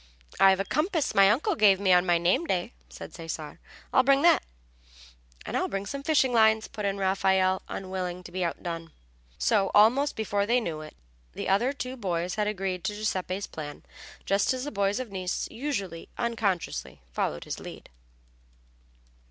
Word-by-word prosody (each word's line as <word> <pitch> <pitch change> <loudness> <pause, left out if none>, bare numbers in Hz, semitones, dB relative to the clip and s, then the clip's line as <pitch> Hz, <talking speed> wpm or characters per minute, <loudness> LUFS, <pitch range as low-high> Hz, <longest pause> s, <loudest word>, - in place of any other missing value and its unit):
"I've 195 0 +6
a 195 - -1
compass 315 - 0
my 195 0 +6
uncle 230 +8 +2
gave 200 -3 +5
me 190 -2 +4
on 180 +1 +4
my 175 -1 +4
name 175 - +2
day," 185 +3 -1 0.2
said - - -10
Cesare. 165 -3 -7 0.3
"I'll 260 - +6
bring 275 +2 +3
that." 340 - +6 1.0
"And - - -4
I'll - - +1
bring 195 0 -3
some 275 +7 -5
fishing 275 -4 +2
lines," 220 -1 +4
put 210 - -6
in 200 0 -1
Raffaelle, 190 -1 +2
unwilling 185 -1 -4
to 175 - -11
be 185 +1 -2
outdone. 165 -1 -4 0.4
So 200 -3 +2
almost 250 +8 +5
before 205 -2 -1
they 240 +2 +3
knew 165 -9 -4
it 155 - -11 0.4
the - - -5
other 205 +7 +2
two 255 -2 -5
boys 180 -4 -2
had 210 -1 0
agreed 190 -4 -3
to 210 - -1
Giuseppe's 195 -2 -2
plan, 145 -2 -8 0.4
just 200 +6 +2
as 255 - -4
the 295 - -4
boys 200 +1 0
of 250 -5 -6
Nice 185 -2 -3
usually 205 - -4
unconsciously 205 - -2
followed 75 +4 -2
his - - -5
lead. - - -10
195 Hz, 170 wpm, -27 LUFS, 180-230 Hz, 1.0 s, I've